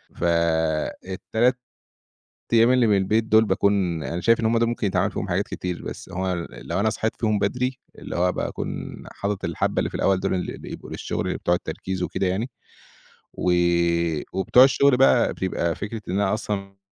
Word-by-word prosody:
فال3 85 +8 0 1.0
أيّام 115 +2 +6
اللي 125 -2 +4
من 105 -2 +4
البيت 105 +4 +2
دول 110 0 +5
باكون 95 -5 +1
أنا 85 +1 -3
شايف 115 +3 +3
إن 110 - +1
هُم 115 +1 +2
ده 115 - +2
ممكن 115 -3 -1
يتعمل 95 +1 +1
فيهم 100 - -4
حاجات 95 +3 0
كتير، 90 -1 -4
بس - - -7
هو 90 -2 -2
لو 85 +4 -4
أنا 110 +1 +2
صحيت 110 +1 -1
فيهم 110 -2 +1
بدري 125 +6 -1 0.2
اللي - - -6
هو 90 +1 +2
باكون - - -4 0.2
حاطط 100 -1 -3
الحبّة - - -1
اللي - - 0
في - - -17
الأوّل 95 -1 +2
دول - - 0
اللي 90 - -3
بيبقوا - - -9
للشغل - - -3
بتوع 85 - +1
التركيز 95 +1 -4
وكده 95 - -1
يعني. 105 +8 -1 0.8
وي 85 -2 +1
وبتوع 95 +7 +5
الشغل 140 0 +4
بقى 125 -2 +4
بتبقى 85 -3 -1
فكرة 110 +1 -5
إن - - -2
أنا 100 0 +1
أصلًا 100 -3 -4
100 Hz, 175 wpm, -24 LUFS, 90-110 Hz, 1.0 s, أيّام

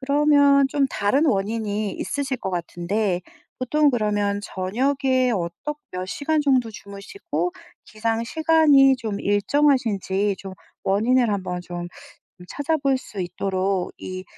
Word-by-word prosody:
그러면 285 0 +4
좀 280 -1 +1
다른 260 +8 +1
원인이 210 -2 -1
있으실 275 -2 -3
거 190 - -4
같은데 180 +2 -2 0.4
보통 295 +4 +2
그러면 205 -3 0
저녁에 255 +7 0
어떻 180 +12 -4
몇 185 0 -4
시간 300 +8 -1
정도 255 -5 +2
주무시고 210 - -5 0.3
기상 225 +1 -2
시간이 300 -3 +4
좀 220 -5 -4
일정하신지 205 -4 +1
좀 195 -1 -8 0.3
원인을 230 +4 +2
한번 185 -3 -3
좀 175 0 -6 0.6
찾아볼 280 -2 0
수 210 -5 -10
있도록 185 +1 -2
이 185 0 -7
225 Hz, 255 characters per minute, -23 LUFS, 195-275 Hz, 0.6 s, 그러면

